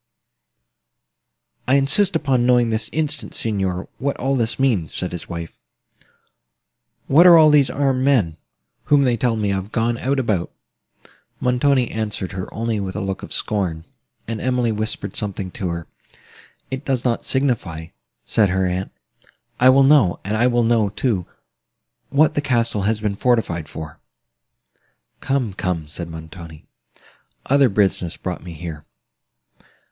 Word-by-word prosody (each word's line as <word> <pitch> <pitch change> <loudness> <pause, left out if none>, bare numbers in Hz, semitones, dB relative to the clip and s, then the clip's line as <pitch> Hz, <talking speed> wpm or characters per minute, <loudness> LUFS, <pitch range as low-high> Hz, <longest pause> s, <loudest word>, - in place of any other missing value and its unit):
"I 130 - +4
insist 155 +8 +4
upon 135 -6 +1
knowing 120 -2 +3
this 110 +1 -2
instant, 155 -2 -3
Signor, 95 -4 -2
what 140 +1 -2
all 135 +2 0
this 115 -3 0
means:" 115 -12 0
said 90 - -3
his 90 - -7
wife—"what 85 - -3
are 170 -1 +9
all 155 -1 +7
these 145 -3 +4
armed 135 -2 0
men, 110 - +2 0.5
whom 145 -1 +4
they 125 -3 +2
tell 115 0 0
me 105 -2 -1
of, 95 +2 -3
gone 115 0 0
out 135 +2 0
about?" 105 -9 -1 0.9
Montoni 125 0 +2
answered 105 -4 -3
her 95 -1 -6
only 115 -1 -2
with 95 -1 -4
a - - -2
look 95 0 -3
of - - -9
scorn; 90 -7 -2 0.4
and 115 -1 -4
Emily 125 -2 +1
whispered 110 +1 -3
something 100 -3 -4
to 90 -1 -4
her. 85 -1 -4 0.9
"It 130 +1 -4
does 130 -4 -1
not 120 -2 0
signify," 110 - -1 0.4
said 105 -3 +2
her 95 0 +1
aunt: 90 +1 -2 0.7
"I 125 - +6
will 135 +1 +6
know; 135 -10 +4
and 105 +3 -2
I 120 +3 +3
will 120 -1 +2
know, 115 -3 +2
too, 100 -3 -1 0.8
what 150 +2 +3
the 145 - 0
castle 115 -6 0
has 110 -1 0
been 105 -2 -1
fortified 100 -10 0
for." 80 -2 -8 1.2
"Come, 130 -7 -1
come," 90 -5 -3
said 85 +3 -7
Montoni, 80 -1 -10 0.8
"other 140 -1 +4
business 95 -4 0
brought 90 -1 -5
me 85 -1 -8
here. 80 -2 -7
110 Hz, 145 wpm, -21 LUFS, 95-130 Hz, 1.2 s, are